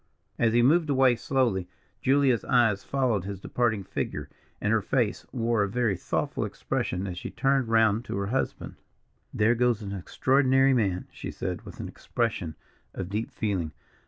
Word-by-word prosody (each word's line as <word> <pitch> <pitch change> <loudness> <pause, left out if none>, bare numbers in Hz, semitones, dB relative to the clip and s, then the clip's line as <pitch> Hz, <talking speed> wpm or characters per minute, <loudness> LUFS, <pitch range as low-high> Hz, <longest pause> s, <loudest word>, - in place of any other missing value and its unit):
As 115 -1 +3
he 120 0 +4
moved 155 +4 +4
away 130 -3 +4
slowly, 115 -8 0 0.3
Julia's 135 -3 +3
eyes 115 -6 +3
followed 125 -8 0
his 100 0 -5
departing 110 -1 0
figure, - - -4 0.3
and 105 - +1
her 115 - +3
face 115 0 -1
wore 115 -3 +1
a 100 - +1
very 115 -2 +1
thoughtful 85 - -2
expression, 90 +2 -2
as 90 -2 -5
she - - -6
turned 135 -2 +1
round 110 -1 +3
to - - -4
her 100 - -1
husband. 125 +7 -3 0.5
"There 110 +2 +3
goes 120 -2 +1
an 100 - -5
extraordinary 135 +7 +3
man," 100 -7 0
she - - -7
said, - - -4
with - - -10
an - - -4
expression 80 -3 -2 0.4
of 95 -1 -4
deep 105 +3 -2
feeling. 95 -8 -2
115 Hz, 165 wpm, -27 LUFS, 100-130 Hz, 0.5 s, he